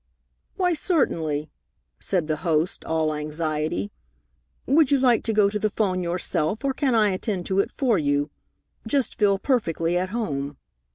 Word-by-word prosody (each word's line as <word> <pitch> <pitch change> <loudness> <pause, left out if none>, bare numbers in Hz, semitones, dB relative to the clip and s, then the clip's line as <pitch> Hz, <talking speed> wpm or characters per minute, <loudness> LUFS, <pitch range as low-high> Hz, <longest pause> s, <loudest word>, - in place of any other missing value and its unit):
"Why, 360 -2 +2
certainly," 160 - 0 0.5
said 180 -4 0
the 155 0 -1
host, 165 +1 0
all 160 -1 0
anxiety. 155 +4 -2 0.7
"Would 295 0 +4
you 280 - +3
like 245 -3 +4
to 225 - +1
go 210 -2 +4
to 210 +1 -2
the 215 - +1
'phone 190 -3 0
yourself, 175 - -1
or 270 - +1
can 265 -3 +1
I 210 -2 +4
attend 185 -1 -3
to 190 0 0
it - - +2
for 240 -8 +1
you? 145 0 0 0.6
Just 270 +1 0
feel 200 -2 +4
perfectly 175 - 0
at 185 +1 -2
home." 145 - -3
185 Hz, 160 wpm, -24 LUFS, 155-230 Hz, 0.7 s, Would